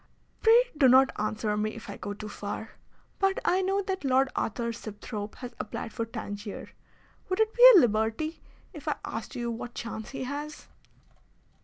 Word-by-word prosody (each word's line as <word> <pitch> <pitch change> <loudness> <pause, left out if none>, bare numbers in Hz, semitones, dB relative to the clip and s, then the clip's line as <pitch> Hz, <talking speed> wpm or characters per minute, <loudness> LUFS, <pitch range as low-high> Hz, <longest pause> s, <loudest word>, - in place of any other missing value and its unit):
"Pray 475 +2 +5
do 290 -4 +5
not 260 +2 +6
answer 215 0 -1
me 215 +1 -1
if 230 - -10
I - - -6
go 205 - -6
too 215 +1 -7
far. 210 +1 -6 0.5
But 390 0 +2
I 365 +2 +3
know 390 +1 0
that 380 -2 -3
Lord 265 0 +3
Arthur 235 +1 -2
Sibthorpe 210 -1 -7
has 245 -1 -8
applied 225 - -5
for 230 -2 -3
Tangier. 205 -3 -6 0.6
Would 370 - -1
it 440 0 +2
be 485 - +3
a - - +10
liberty 225 +8 0 0.3
if - - -11
I - - +1
asked - - -6
you 240 -1 -2
what 240 +1 -6
chance 220 -1 -6
he 270 - -5
has?" 290 +3 -6
240 Hz, 175 wpm, -28 LUFS, 215-310 Hz, 0.6 s, a